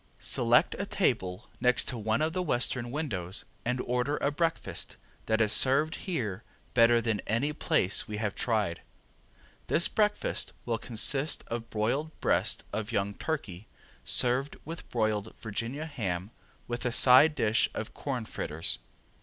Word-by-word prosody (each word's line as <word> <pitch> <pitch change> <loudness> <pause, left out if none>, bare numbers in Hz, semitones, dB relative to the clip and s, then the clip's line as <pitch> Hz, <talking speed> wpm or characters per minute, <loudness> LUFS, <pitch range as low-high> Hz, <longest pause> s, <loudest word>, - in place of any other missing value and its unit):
Select 120 0 +3
a 200 - -2
table 115 - -1
next 125 0 +3
to - - -3
one 110 +5 0
of 160 +1 0
the 185 - -1
western 125 -6 -1
windows 110 - -3 0.2
and 125 +1 -1
order 125 +4 -1
a 140 - 0
breakfast 165 +2 -2 0.3
that 110 0 +2
is 110 -2 +3
served 145 +4 +4 0.2
here 115 - -2 0.3
better 120 -1 +5
than 110 -2 0
any 125 +8 0
place 150 - +1
we 105 - -4
have 105 -2 -2
tried. 105 -8 0 0.9
This 170 - +3
breakfast 210 -1 0
will 115 -2 -1
consist 135 +7 +1
of 115 0 -4
broiled 135 +9 -2
breast - - +2
of 110 +1 -3
young 100 -2 0
turkey, 105 - -4 0.4
served 130 +3 +1
with 165 +2 -8
broiled 110 -2 -1
Virginia 115 +7 -4
ham 100 - -4 0.4
with 120 0 -4
a 125 - 0
side 135 +6 +6
dish 110 0 +2
of 110 - -5
corn 130 -5 -4
fritters. 80 - +1
120 Hz, 145 wpm, -29 LUFS, 110-145 Hz, 0.9 s, side